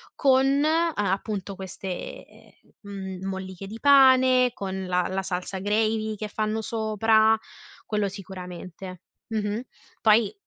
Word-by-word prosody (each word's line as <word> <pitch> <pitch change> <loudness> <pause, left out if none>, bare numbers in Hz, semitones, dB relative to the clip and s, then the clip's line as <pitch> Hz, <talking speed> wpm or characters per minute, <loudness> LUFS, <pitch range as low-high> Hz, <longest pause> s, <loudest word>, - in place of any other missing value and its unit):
con 270 +1 +3
a 330 +1 +2 0.2
appunto 195 -1 -3
queste 190 -1 -8 0.2
m 195 -2 -6
molliche 190 0 -6
di 220 +3 -8
pane, 260 -2 +6
con 190 -3 -4
la 180 -1 +1
la 190 +1 -1
salsa 185 +1 -4
gravy 215 +2 0
che 210 0 -5
fanno 215 +1 -2
sopra, 220 0 +3 0.5
quello 210 -2 0
sicuramente. 185 -1 -9 0.3
Mh-mh. 215 -1 -2 0.4
Poi 215 -1 +4
210 Hz, 115 wpm, -25 LUFS, 190-225 Hz, 0.5 s, pane